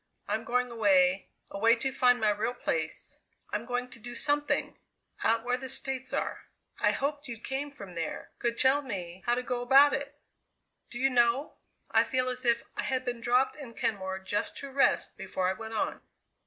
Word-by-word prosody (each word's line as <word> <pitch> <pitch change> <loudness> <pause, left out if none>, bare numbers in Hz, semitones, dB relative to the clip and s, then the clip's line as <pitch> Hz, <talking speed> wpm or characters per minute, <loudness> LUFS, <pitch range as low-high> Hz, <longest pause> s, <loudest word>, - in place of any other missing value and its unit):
I'm 220 - -1
going 250 0 0
away, 195 -4 +3 0.2
away 225 +4 +4
to 265 +3 -2
find 250 -1 +4
my 215 -1 +3
real 220 +4 -1
place. 160 -1 -3 0.3
I'm 235 - -3
going 245 0 -1
to - - -11
do 240 +2 -8
something 290 0 0 0.4
out 225 0 +3
where 245 +1 +1
the 260 0 -7
States 265 0 -3
are. - - -2 0.3
I - - +4
hoped 285 +1 -2
you 235 -2 -6
came 270 +5 -3
from 200 -10 -11
there; 165 -2 -5
could 235 -1 0
tell 265 +3 +4
me 185 -8 -6
how 240 - +4
to 250 - -2
go 245 0 -2
about 270 +4 +6
it. 280 +1 -3 0.7
Do 240 - -7
you 265 +2 +2
know, 240 +3 +3 0.4
I - - +5
feel 255 0 0
as 250 0 -5
if 235 0 +3
I - - -1
had 260 -1 -1
been 240 -1 -3
dropped 250 +3 +2
in 260 -6 -10
Kenmore 190 -3 -1
just 190 +2 -3
to 280 -1 -6
rest 275 +1 +2
before 185 -1 -2
I - - +1
went 220 +2 -7
on!" - - -1
245 Hz, 195 wpm, -29 LUFS, 220-265 Hz, 0.7 s, about